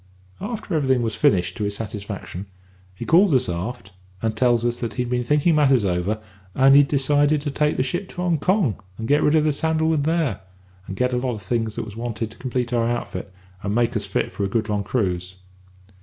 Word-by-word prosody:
"After 220 -5 -5
everything 130 -5 +2
was 110 -2 -1
finished 90 -3 +2
to 105 - -2
his 100 0 -1
satisfaction, 105 -3 -6 0.5
he - - -6
calls 175 -1 +5
us 130 0 +2
all 90 +4 -2
aft, 120 -5 -11 0.3
and 110 +2 -1
tells 120 0 +2
us 120 0 0
that 115 - -4
he'd 125 -1 -2
been 125 0 +1
thinking 150 +6 +3
matters 135 -7 +4
over, 95 +4 0 0.4
and 135 +1 +6
he'd 145 0 +7
decided 145 +2 +3
to 145 0 -3
take 150 +1 +1
the - - +2
ship 175 +9 -3
to - - -13
Hong 175 -3 0
Kong, 180 - +1 0.2
and 110 - -4
get 145 +1 +3
rid 150 - +3
of 155 - +4
the 155 -1 +2
sandalwood 160 0 +1
there, 155 - 0 0.5
and 95 - -5
get 125 +4 0
a - - +1
lot 125 -1 -1
of 105 - -9
things 115 +1 -1
that - - -3
was 105 -1 -10
wanted 115 -1 -4
to - - -13
complete 125 -2 -2
our 115 -1 +2
outfit, 120 -4 -4 0.3
and 100 +1 -2
make 120 +1 +1
us 105 -2 -2
fit 95 - -1
for 100 - -4
a 100 - 0
good 110 +1 -1
long 105 -1 0
cruise. 90 -5 -2
120 Hz, 225 wpm, -23 LUFS, 105-145 Hz, 0.5 s, he'd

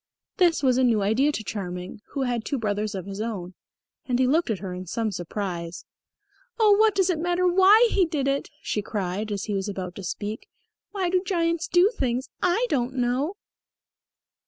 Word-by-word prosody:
This 345 -6 +3
was 255 -1 +3
a - - +3
new 225 -5 +3
idea 245 +9 +3
to 225 - -4
Charming, 180 -2 -5
who 275 - -1
had 240 -3 -1
two 280 - -2
brothers 210 -2 -2
of 185 -2 -5
his 200 +1 -6
own; 195 -6 -4 0.5
and 250 -2 +1
he 260 - +3
looked 310 +5 +2
at 220 - 0
her 185 -1 -6
in 180 0 -7
some 220 +4 -1
surprise. 175 -2 -5 0.7
"Oh, 425 -2 +6
what 435 -2 +4
does 380 -1 +3
it 325 - -2
matter 350 +2 +1
why 385 +6 +6
he 375 -4 +3
did 295 -4 -1
it?" 275 0 -1
she 210 - -1
cried, 205 +1 -3
as 200 -1 -2
he 210 - -3
was 195 +1 -2
about 185 -3 -5
to 200 - -7
speak. 210 - -5 0.4
"Why 375 -4 -2
do 365 0 +3
giants 335 -3 0
do 360 +4 +4
things? 255 0 -1
I 365 +7 +2
don't 260 - -1
know." 255 +8 0
245 Hz, 195 wpm, -25 LUFS, -, 0.7 s, Oh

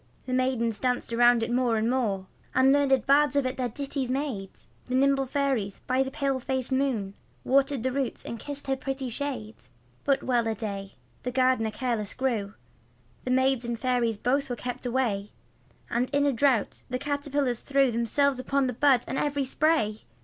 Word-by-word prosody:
The 255 - -3
maidens 245 -4 +1
danced 250 -2 -1
about 240 0 +5
it 235 - -2
more 245 -2 +2
and 220 +1 +1
more, 220 -7 0 0.3
And 265 +1 +5
learned 270 -3 +3
bards 285 +1 +4
of 280 -2 +2
it 255 - -1
their 250 -2 -1
ditties 275 +1 -3
made; 255 -8 -2 0.4
The 255 - -2
nimble 270 0 +3
fairies 255 -8 -1
by 255 +1 +2
the 265 - 0
pale 275 -1 -1
faced 260 0 -2
moon 260 -8 0 0.3
Watered 275 -1 +2
the 260 - 0
root 270 -1 -3
and 230 - -5
kissed 285 +2 -5
her 270 -1 0
pretty 270 0 -4
shade. 265 - -4 0.5
But 275 -1 +1
well 240 -3 +1
a 225 - 0
day, 200 -2 -5 0.3
the 250 - -3
gardener 255 -3 +2
careless 215 -2 -2
grew, 225 -6 -1 0.7
The - - -2
maids 260 0 +2
and 235 -1 -3
fairies 245 -3 +1
both 270 +5 0
were 245 - -2
kept 245 +1 -5
away, 230 -5 -1 0.5
And 245 +2 0
in 285 0 +2
a 285 - +2
drought 245 -3 +1
the 255 - -1
caterpillars 285 -3 -1
threw 275 -2 +2
Themselves 255 +4 +1
upon 275 +2 +1
the 250 - -1
bud 260 -1 +4
and 270 - -2
every 285 -1 0
spray. 255 -7 +1
255 Hz, 185 wpm, -27 LUFS, 235-275 Hz, 0.7 s, about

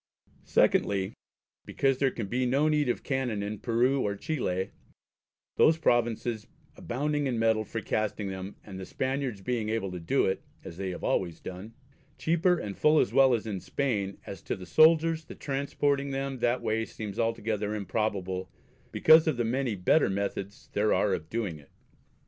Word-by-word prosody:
Secondly, 95 -2 +2 0.5
because 135 -1 0
their 135 - +3
can 115 -4 -5
be 125 +6 -1
no 140 +5 +2
need 150 -3 +2
of - - -1
canon 125 -7 -1
in 105 0 -4
Peru 125 +3 +2
or 100 -3 -1
Chile, 100 - -2 0.9
those 160 +1 +5
provinces 120 -5 0 0.3
abounding 145 +3 -1
in 125 -3 -1
metal 110 -1 +2
for 115 +1 -5
casting 105 -1 -2
them, 95 +1 -6
and 95 -2 -9
the 95 - -6
Spaniards 130 -5 -2
being 115 -1 -2
able 110 -4 -1
to 90 - -5
do 85 +12 +1
it 95 - -1 0.2
(as 85 - -9
they 95 -1 -3
always 85 -2 -1
have - - -26
done) 95 +5 -8 0.4
cheaper 170 +2 +2
and 100 -9 -5
full 155 +1 +5
as - - +1
well 135 -2 +6
as 115 - -4
in 105 -4 -3
Spain, 110 -5 -1
and 100 - -13
as 100 - -8
to - - -3
the 95 - -9
Soldiers, 160 - +4
the - - -10
transporting 140 0 -1
them 135 -1 -3
that 120 +1 +1
way 110 0 0
seems 105 -3 -7
altogether 110 -2 -1
improbable 100 -3 -2 0.4
because 160 +1 +6
of 155 -6 +1
the 120 - 0
many 125 -1 0
better 95 - +3
methods 100 0 -4
there 105 +1 +2
are 100 - +2
of 80 -3 -4
doing 105 -9 -3
it. 70 - -19
115 Hz, 180 wpm, -28 LUFS, 100-135 Hz, 0.9 s, well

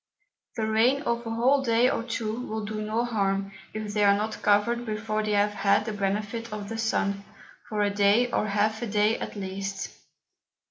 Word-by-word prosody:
The 220 - -1
Rain 235 +6 +3
of 235 -3 -1
a - - -2
whole 250 +5 +3
Day 235 -1 +3
or 255 - 0
two 230 -2 -3
will 220 -1 -3
do 215 0 -4
no 220 +3 -1
harm, 195 -4 0 0.2
if 215 -1 -5
they 210 0 +2
are 200 0 +6
not 215 +1 -3
covered 210 +4 +2
before 215 -1 -2
they 215 -1 -1
have 205 0 +2
had 200 0 +2
the 220 - -3
Benefit 210 +3 -2
of 205 -1 -5
the 225 - -4
Sun, 200 -3 0 0.5
for 210 -1 -1
a 205 - +1
Day, 205 +5 +3
or 215 - 0
half 215 +2 +1
a 240 - -2
Day 210 +1 +2
at - - -6
least. 195 0 -4
215 Hz, 195 wpm, -27 LUFS, 205-230 Hz, 0.5 s, are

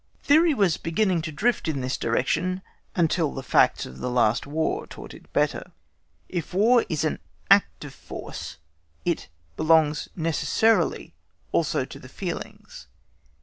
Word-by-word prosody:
Theory 315 +1 +5
was 195 -7 +2
beginning 175 +1 0
to 160 0 -5
drift 210 +10 0
in 145 -4 -1
this 130 +1 -1
direction 180 +11 0 0.3
until 165 -2 +2
the 135 - -5
facts - - +3
of 65 - -11
the 125 - -2
last 120 0 +2
War(*) 160 +2 -1
taught - - -10
it - - -16
better. - - -1 0.5
If 175 0 -5
War 230 +5 +5
is 155 -3 -1
an 155 - -1 0.3
act 200 -6 +4
of 140 - -9
force, - - -8 0.5
it - - -1 0.3
belongs 155 -1 +3
necessarily 170 - +1 0.4
also 145 -5 +1
to - - -11
the 130 - -13
feelings. 170 - -7
160 Hz, 145 wpm, -25 LUFS, 140-190 Hz, 0.5 s, Theory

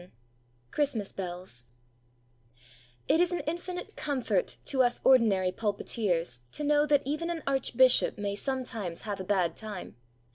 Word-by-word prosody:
VII 180 - -16 0.6
CHRISTMAS 255 -9 0
BELLS 175 -9 -7 1.4
It 320 - +3
is 355 0 +3
an 350 - -1
infinite 350 +3 -5
comfort 250 -10 -1
to 265 -2 +2
us 245 -1 +2
ordinary 210 -8 +4
pulpiteers 200 - -1
to - - +1
know 295 0 +3
that 290 -1 +3
even 305 +5 -2
an 335 -2 -3
Archbishop 260 -2 +4
may 205 -1 -2
sometimes 225 -7 -3
have 205 -2 -4
a - - -4
bad 185 -3 +1
time! 210 - -7
230 Hz, 140 wpm, -29 LUFS, 190-285 Hz, 1.4 s, ordinary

